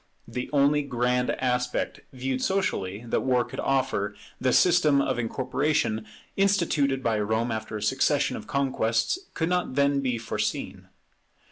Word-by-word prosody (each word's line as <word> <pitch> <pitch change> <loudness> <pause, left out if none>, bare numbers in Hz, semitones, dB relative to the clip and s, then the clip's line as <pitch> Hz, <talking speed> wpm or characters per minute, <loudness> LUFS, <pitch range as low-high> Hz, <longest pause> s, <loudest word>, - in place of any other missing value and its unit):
The 125 0 -4
only 145 +1 +3
grand 125 -2 0
aspect, 125 -1 -1
viewed 130 0 -3
socially, 115 - -1
that 115 - 0
war 125 -2 +2
could - - -8
offer, 130 -7 0 0.2
the 130 - +2
system 155 -2 +4
of 130 -3 0
incorporation 125 -2 0 0.3
instituted 160 -9 +2
by 110 -2 +1
Rome 110 +3 0
after 110 -1 -4
a 105 - -5
succession 135 +5 +2
of - - -8
conquests, 135 - 0 0.2
could 160 - 0
not 180 -7 0
then 140 0 +3
be 130 -3 -1
foreseen. 115 0 -3
130 Hz, 140 wpm, -26 LUFS, 115-140 Hz, 0.3 s, system